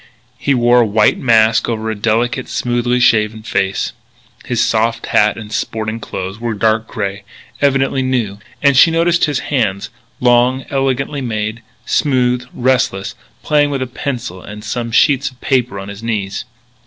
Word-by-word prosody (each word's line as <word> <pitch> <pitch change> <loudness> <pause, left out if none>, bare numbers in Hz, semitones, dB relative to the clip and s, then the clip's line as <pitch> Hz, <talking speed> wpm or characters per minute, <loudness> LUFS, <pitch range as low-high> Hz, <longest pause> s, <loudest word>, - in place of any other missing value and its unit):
He 140 +1 +1
wore 120 0 +4
a - - +3
white 105 +1 +3
mask 115 -2 +3
over 110 -1 -2
a - - -3
delicate, 115 +4 0
smoothly 120 0 0
shaven 110 -2 +2
face. 95 -3 -1 0.5
His 120 -2 0
soft 115 +1 0
hat 105 0 +2
and 105 -1 -9
sporting 110 0 -3
clothes 95 -1 -6
were 115 -1 -2
dark 110 +2 +1
grey, 100 -1 -4 0.4
evidently 135 -1 +2
new. 120 -6 -1 0.2
And 140 -1 +5
she 155 +6 +7
noticed 170 +1 +2
his 145 -3 -1 0.2
hands 100 -7 0 0.3
long, 125 +2 +3
elegantly 135 +1 -1
made, 110 -2 -3 0.2
smooth, 125 -3 +1
restless, 125 -6 0 0.3
playing 145 -1 +2
with 135 -2 -2
a - - -3
pencil 120 -7 -5
and 105 +2 -10
some 115 +2 -3
sheets 140 +3 +3
of 130 -2 -22
paper 125 -6 0
on 95 - -7
his 100 +1 -9
knees. 105 -4 -3
120 Hz, 155 wpm, -16 LUFS, 110-130 Hz, 0.5 s, she